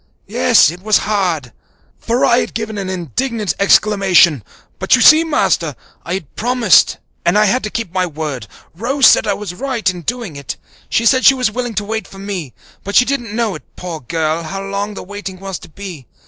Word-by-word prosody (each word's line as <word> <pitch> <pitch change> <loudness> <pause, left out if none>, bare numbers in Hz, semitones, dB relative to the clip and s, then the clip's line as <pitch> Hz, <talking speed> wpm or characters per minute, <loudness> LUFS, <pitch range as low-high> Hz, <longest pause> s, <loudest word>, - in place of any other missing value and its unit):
Yes, 230 -5 +4
it 175 +1 -11
was 215 +1 +3
hard" 175 - -1 0.5
for 235 +2 +1
I 235 - +4
had - - -4
given 220 -2 -4
an 190 -1 -4
indignant 200 - -2
exclamation 195 - +4 0.4
"but - - +4
you - - 0
see, 315 +1 +8
Master, 315 -2 0 0.3
I 170 - -3
had 180 -7 -8
promised 240 -4 +3 0.3
and 170 +4 +2
I 215 - +5
had 245 +6 +1
to - - -3
keep 220 -5 -5
my 185 -1 0
word. 150 -8 -5 0.3
Rose 255 - +1
said - - +6
I 200 - +1
was 205 -4 -6
right 255 +2 -3
in 180 -2 0
doing 230 -3 -4
it. 140 -1 -6 0.3
She 230 - +1
said 260 +2 +4
she 275 - +7
was 250 -4 0
willing 245 0 -4
to 210 - -1
wait 220 -2 -4
for 195 - -14
me, 195 -8 -5 0.3
but 200 +1 -5
she 250 - +6
didn't 240 -6 -3
know, 230 -4 -1 0.2
poor 175 -3 -6
girl, 160 +4 -2
how 195 +4 -6
long 200 +1 -4
the - - -7
waiting 195 -1 -8
was 195 -1 -6
to - - -14
be. 170 - -9
200 Hz, 205 wpm, -16 LUFS, 175-230 Hz, 0.5 s, see